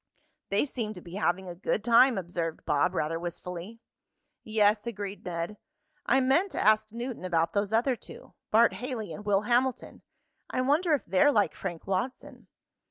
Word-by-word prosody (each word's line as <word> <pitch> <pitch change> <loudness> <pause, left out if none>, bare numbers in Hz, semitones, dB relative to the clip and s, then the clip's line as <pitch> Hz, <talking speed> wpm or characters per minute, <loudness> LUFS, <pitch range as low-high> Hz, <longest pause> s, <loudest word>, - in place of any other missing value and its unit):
"They 200 +7 +2
seem 225 -6 -4
to - - -9
be 170 - -12
having 190 -1 0
a 175 - -5
good 195 +4 -2
time," 240 +1 +5
observed 170 -3 -4
Bob, 150 +6 +1
rather 165 0 -1
wistfully. 180 +5 -6 0.6
"Yes," 215 0 +2
agreed 205 -3 -5
Ned. 175 +3 -4 0.5
"I 270 - +4
meant 320 +10 +2
to - - -2
ask 215 0 +3
Newton 235 -1 -5
about 165 -2 0
those 200 0 0
other 245 +4 +2
two - - -13 0.2
Bart 230 +2 +5
Haley 235 - -5
and 205 - -8
Will 200 -1 +2
Hamilton. 245 +3 0 0.5
I 255 - -1
wonder 300 +5 +3
if 280 - -6
they're 190 +11 +4
like 210 -7 +2
Frank 175 -4 -6
Watson?" 195 +7 -4
210 Hz, 165 wpm, -28 LUFS, 180-240 Hz, 0.6 s, time